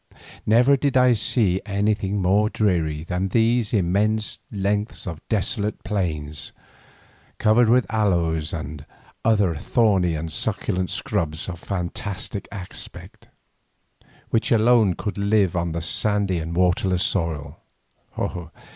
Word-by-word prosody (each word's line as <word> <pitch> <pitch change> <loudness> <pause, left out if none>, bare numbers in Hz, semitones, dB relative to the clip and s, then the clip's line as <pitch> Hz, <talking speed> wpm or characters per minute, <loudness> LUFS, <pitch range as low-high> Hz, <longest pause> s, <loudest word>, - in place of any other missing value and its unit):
Never 125 +6 +5
did 140 -1 +1
I 125 -1 +5
see 105 -4 +1
anything 100 -1 0
more 100 +4 +3
dreary 85 -9 0
than 90 +2 -2
these 115 +2 +2
immense 105 +2 +1
lengths 105 +2 -1
of 85 -3 -6
desolate 105 0 -1
plains 75 -7 -2 0.8
covered 110 +2 +4
with 125 +1 +4
aloes 85 -7 +1
and 75 -2 -6 0.4
other 105 -6 +3
thorny 95 - +2
and 80 +1 -4
succulent 90 +5 -2
shrubs 80 -7 -2
of 90 -2 -6
fantastic 100 +2 -4
aspect, 95 -4 -8 1.0
which 115 - +1
alone 115 -4 +4
could 105 -1 -4
live 100 -3 +2
on 85 -1 -1
the 85 +1 -3
sandy 100 +1 0
and 80 +1 -5
waterless 90 +1 +2
soil. 80 -5 -2
100 Hz, 115 wpm, -23 LUFS, 85-110 Hz, 1.0 s, Never